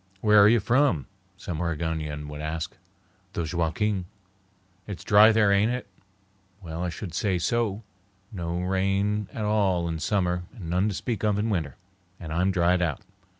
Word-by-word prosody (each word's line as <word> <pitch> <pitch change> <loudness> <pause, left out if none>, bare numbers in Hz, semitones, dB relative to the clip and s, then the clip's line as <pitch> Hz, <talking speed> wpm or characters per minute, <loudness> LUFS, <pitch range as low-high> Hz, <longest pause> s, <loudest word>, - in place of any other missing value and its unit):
"Where 105 0 +6
are 105 - +7
you 120 +1 +5
from?" 120 - +2 0.3
some 90 -4 -5
Oregonian 80 -3 -3
would 75 0 -7
ask. 80 +5 -4 0.6
"The 85 - -2
Joaquin." 90 +4 0 0.8
"It's 100 -4 -7
dry 105 +2 +7
there, 105 -2 +4
ain't 100 +4 +3
it?" 125 0 -3 0.7
"Well, 85 -3 -6
I 90 - -1
should 85 0 -7
say 95 +1 0
so. 110 +3 -1 0.5
No 85 -4 -3
rain 95 +2 0
at 110 - -4
all 95 -5 +1
in 80 -1 -3
summer 90 -1 0
and 90 -8 -7
none 90 +4 +2
to 100 - -3
speak 115 -2 -3
of 105 -2 +2
in 110 +2 0
winter, 80 -9 -2 0.4
and 80 -2 -6
I'm 90 +3 +2
dried 90 -1 +2
out. 80 -6 -1
95 Hz, 165 wpm, -26 LUFS, 85-105 Hz, 0.8 s, are